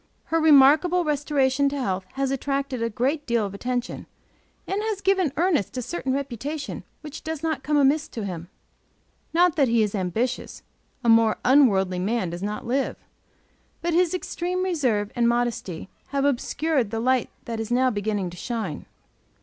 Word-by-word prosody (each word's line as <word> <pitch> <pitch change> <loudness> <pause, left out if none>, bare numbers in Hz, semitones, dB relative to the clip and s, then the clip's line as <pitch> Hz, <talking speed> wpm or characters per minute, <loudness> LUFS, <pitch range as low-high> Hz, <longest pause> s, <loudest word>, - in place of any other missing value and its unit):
Her 330 - +4
remarkable 315 +4 +6
restoration 280 -2 +1
to 280 0 -4
health 190 -6 -2
has 270 0 -1
attracted 275 -2 -2
a 230 - 0
good 270 +7 -1
deal 235 -3 +1
of 200 - -6
attention, 245 +4 -3 0.6
and 390 +2 -2
has 430 -2 -2
given 380 -6 +2
Ernest 320 - +1
a - - -1
certain 265 0 -3
reputation 280 +2 -4 0.2
which 300 0 -9
does 320 -1 -5
not 315 -4 -1
come 295 +2 +1
amiss 290 +2 +3
to 220 -3 -6
him. 175 -2 -6 0.8
Not 345 -1 +3
that 280 -3 +4
he 230 -1 +3
is 210 - -2
ambitious; 220 +6 -2 0.4
a - - -1
more 225 -1 +5
unworldly 195 -9 +4
man 195 -1 -1
does 175 +1 -6
not 210 +1 -4
live; 260 +3 0 0.9
but 345 0 0
his 355 +1 +3
extreme 365 0 -2
reserve 255 - 0
and 235 -1 +3
modesty 235 -8 -2 0.2
have 280 0 -1
obscured 285 -1 0
the 225 - -3
light 255 +1 +1 0.2
that 230 -1 -4
is 225 0 -4
now 255 +1 +3
beginning 205 -3 -2
to 175 - -11
shine. 230 +3 -4
260 Hz, 165 wpm, -24 LUFS, 225-300 Hz, 0.9 s, remarkable